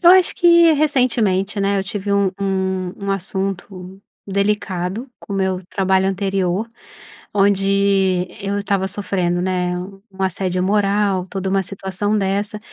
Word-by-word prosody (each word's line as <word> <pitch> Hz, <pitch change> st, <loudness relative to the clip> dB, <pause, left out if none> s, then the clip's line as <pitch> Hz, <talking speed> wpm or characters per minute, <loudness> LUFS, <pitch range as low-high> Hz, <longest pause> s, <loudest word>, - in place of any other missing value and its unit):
Eu 345 Hz, -, +7 dB
acho 370 Hz, 0 st, +5 dB
que, 340 Hz, -1 st, +6 dB
recentemente, 235 Hz, -10 st, +1 dB
né, 200 Hz, 0 st, +1 dB
eu 190 Hz, -, -2 dB
tive 200 Hz, 0 st, -3 dB
um 200 Hz, -1 st, +2 dB
um 190 Hz, -2 st, -1 dB
um -, -, 0 dB
assunto 190 Hz, 0 st, -4 dB, 0.3 s
delicado 200 Hz, +2 st, -1 dB
com -, -, -9 dB
meu 190 Hz, -2 st, 0 dB
trabalho 190 Hz, -1 st, +1 dB
anterior, 195 Hz, +1 st, -1 dB, 0.7 s
onde 195 Hz, -2 st, +2 dB
eu 200 Hz, +1 st, -1 dB
estava 200 Hz, -1 st, 0 dB
sofrendo, 180 Hz, -3 st, -1 dB
né, 180 Hz, -1 st, -1 dB
u 195 Hz, +1 st, -9 dB
um 190 Hz, 0 st, -8 dB
assédio 185 Hz, 0 st, -1 dB
moral, 200 Hz, -1 st, +1 dB
toda 190 Hz, -1 st, -3 dB
uma 195 Hz, 0 st, +1 dB
situação 195 Hz, +2 st, -2 dB
dessa, 200 Hz, +2 st, -1 dB
195 Hz, 135 wpm, -19 LUFS, 190-205 Hz, 0.7 s, Eu